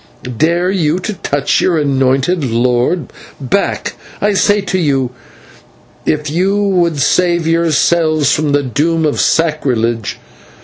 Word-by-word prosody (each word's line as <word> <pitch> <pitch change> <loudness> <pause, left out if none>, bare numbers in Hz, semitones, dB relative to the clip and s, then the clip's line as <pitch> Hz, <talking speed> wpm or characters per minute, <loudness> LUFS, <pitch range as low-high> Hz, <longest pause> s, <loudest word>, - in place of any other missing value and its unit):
dare 170 +4 +2
you 170 -4 0
to 210 +4 -4
touch 145 -7 -1
your 175 -3 +1
anointed 135 +3 +1
lord? 125 +5 0 0.3
Back, 145 +9 -1 0.3
I 205 0 +1
say 205 +1 +2
to 185 -1 -2
you, 135 -6 0 1.0
if 150 0 0
you 185 +7 0
would 175 -6 +1
save 170 +4 +2
yourselves 160 -2 +2
from 150 -1 0
the 145 0 +2
doom 155 +5 0
of 150 - -1
sacrilege. 125 -9 0
155 Hz, 125 wpm, -14 LUFS, 140-175 Hz, 1.0 s, dare